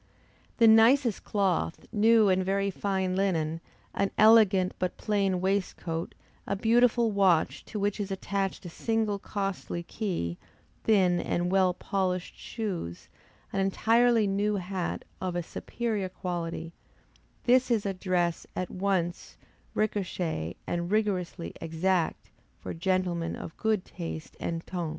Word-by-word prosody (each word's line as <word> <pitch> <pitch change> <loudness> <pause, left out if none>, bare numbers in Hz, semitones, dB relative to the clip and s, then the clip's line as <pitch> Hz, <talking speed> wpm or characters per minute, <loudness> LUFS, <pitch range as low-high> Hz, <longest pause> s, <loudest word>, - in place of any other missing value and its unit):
The 230 - +6
nicest 225 +1 +5
cloth, 190 -5 0
new 220 0 +5
and 185 -1 +3
very 195 +1 0
fine 190 -1 -1
linen, 165 -4 0 0.3
an 200 - +1
elegant 210 -4 +6
but 185 -1 -2
plain 195 -3 0
waistcoat; 185 -4 -2 0.3
a 200 - 0
beautiful 230 +2 +3
watch, 190 -5 +2
to 210 - -5
which 205 +1 0
is 205 -1 -2
attached 195 0 -2
a - - -5
single 220 +2 -1
costly 195 -4 -3
key, 170 - -3 0.5
thin 185 -5 +4
and 175 +1 -1
well 190 -2 +3
polished 185 -2 -2
shoes, 185 - -5 0.4
an 195 - 0
entirely 225 +4 +3
new 205 +1 +1
hat, 185 -1 -3 0.2
of 185 -2 -2
a 175 - -1
superior 215 +1 -3
quality 170 -3 -4 0.7
this 255 +1 +4
is 225 -4 +1
a 195 - 0
dress 180 -2 -1
at 185 - -3
once 185 -3 -2 0.4
recherché 180 - -1
and 170 0 -2
rigorously 190 -5 -1
exact, 165 +1 -1 0.3
for - - -6
gentlemen 175 -1 -1
of 160 - -8
good 215 -4 0
taste 165 -3 -7
and 165 0 -3
ton. 175 -3 -3
190 Hz, 130 wpm, -28 LUFS, 175-210 Hz, 0.7 s, The